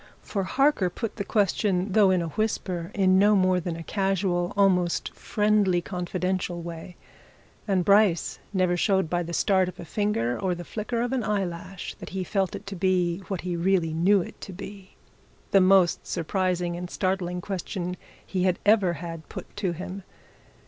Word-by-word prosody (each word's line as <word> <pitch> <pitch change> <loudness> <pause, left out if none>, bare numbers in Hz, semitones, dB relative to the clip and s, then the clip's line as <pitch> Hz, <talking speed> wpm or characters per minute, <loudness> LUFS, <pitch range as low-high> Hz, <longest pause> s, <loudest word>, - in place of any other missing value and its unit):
For 195 -3 -2
Harker 270 -5 +2
put 225 +5 -5
the 200 - -2
question, 195 -1 +1
though 200 0 +5
in 185 -2 +2
a 165 - -4
whisper, 185 -4 -2
in 190 -1 +4
no 210 +1 +5
more 185 -1 +3
than 170 -1 -4
a 165 - -7
casual, 190 -2 0
almost 180 -3 +2
friendlily 210 -4 +2
confidential 180 0 -2
way, 170 +1 -8 0.7
and 190 -3 +1
Bryce 200 -4 +3
never 185 -3 +2
showed 190 -2 +1
by 175 0 +1
the 170 0 -5
start 190 +1 +2
of - - -12
a - - -7
finger 160 - -1
or 185 -2 0
the 175 0 -8
flicker 230 +5 -3
of 245 +2 -2
an 255 -3 0
eyelash 190 -2 -3
that - - -8
he 190 0 -3
felt 190 -1 -1
it - - -8
to 195 0 -6
be 180 -1 +1
what 190 -4 -3
he 180 -1 -3
really 170 -2 +1
knew 185 +4 +3
it - - -12
to - - -7
be 195 +1 -10 0.6
the 195 - +6
most 185 -2 +4
surprising 180 0 -1
and 175 0 -6
startling 185 -2 -1
question 180 -1 -4 0.3
he 185 - -2
had 185 -1 +2
ever 205 -4 +4
had 165 0 -7
put - - -9
to 195 -3 0
him. 185 +3 -6
185 Hz, 175 wpm, -26 LUFS, 175-200 Hz, 0.7 s, the